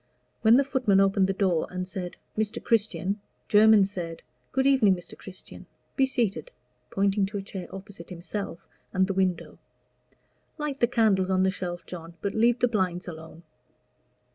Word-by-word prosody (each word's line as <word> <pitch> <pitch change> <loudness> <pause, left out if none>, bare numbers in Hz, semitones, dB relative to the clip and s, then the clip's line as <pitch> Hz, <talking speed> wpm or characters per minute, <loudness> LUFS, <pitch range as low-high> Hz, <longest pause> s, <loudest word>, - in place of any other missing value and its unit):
When 225 +1 +6
the 275 - +5
footman 250 -8 +2
opened 195 -1 +3
the - - +1
door 190 -4 +1
and 185 0 -4
said, 185 -2 -6 0.2
"Mr. 220 +2 -1
Christian," 210 -3 0 0.3
Jermyn 215 -1 +6
said, 175 -4 -6 0.3
"Good 265 0 +1
evening, 255 -9 +5
Mr. 175 - -10
Christian. 190 -1 -11 0.3
Be 270 -1 +3
seated," 240 - -1 0.4
pointing 195 0 +1
to 205 +1 -5
a 195 - -4
chair 190 -2 -7
opposite 195 -2 -10
himself 180 +1 -6 0.3
and 190 0 +3
the 195 - -2
window. 185 -2 -1 1.0
"Light 295 -3 -3
the 240 - +4
candles 210 -6 +2
on 185 0 +3
the 190 - +3
shelf, 175 -2 -5
John, 170 -1 -9
but 200 - -2
leave 235 +2 +3
the 245 - +3
blinds 185 -5 -1
alone." 160 0 -9
195 Hz, 165 wpm, -27 LUFS, 185-220 Hz, 1.0 s, When